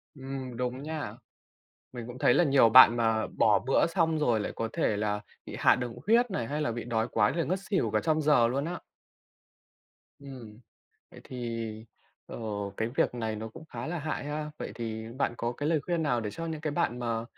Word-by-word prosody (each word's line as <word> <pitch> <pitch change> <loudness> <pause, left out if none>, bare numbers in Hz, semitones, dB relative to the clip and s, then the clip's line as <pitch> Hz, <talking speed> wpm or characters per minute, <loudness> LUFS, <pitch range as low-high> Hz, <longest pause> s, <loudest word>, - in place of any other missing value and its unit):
Ừm. 135 -2 -6
Đúng 125 +2 -3
nha! 150 -8 -4 0.8
Mình 120 -2 -7
cũng 125 +1 -8
thấy 120 - +4
là 175 - +4
nhiều 135 -6 +5
bạn 120 0 +9
mà 115 -2 +1
bỏ 105 - +3
bữa 135 +5 +2
xong 165 -2 +1
rồi 120 -7 +2
lại - - -3
có 115 - -2
thể 105 - +1
là 105 0 -1 0.3
bị - - -7
hạ - - +5
đường 125 -2 -4
huyết 235 +1 +4
này 120 -11 -2
hay 150 +5 -3
là 120 - 0
bị 120 - -5
đói 115 -1 -1
quá 105 -1 +3
rồi 170 +1 -1
ngất 185 +3 0
xỉu 195 - +1
cả - - +1
trong 155 -1 +1
giờ 145 -6 +5
luôn 135 +3 -1
á. 175 +2 -4 1.4
Ừm. 125 -6 -11 0.5
Vậy - - -13
thì, 115 -3 -5 0.4
ờ, - - -8 0.4
cái 110 - -1
việc - - +2
này 110 -2 -3
nó 110 +1 -5
cũng 115 - -12
khá 125 -5 -7
là 170 +1 -3
hại 155 -1 -3
ha? 150 +1 -4
Vậy - - -5
thì 110 -1 -5
bạn 120 - 0
có 120 +1 -2
cái 145 +5 -3
lời 160 -3 +2
khuyên 170 -2 0
nào 125 -6 +1
để 105 -2 -4
cho 165 +10 -6
những 160 -2 -4
bạn 125 -8 0
mà 115 -1 -2
125 Hz, 215 wpm, -29 LUFS, 115-155 Hz, 1.4 s, bạn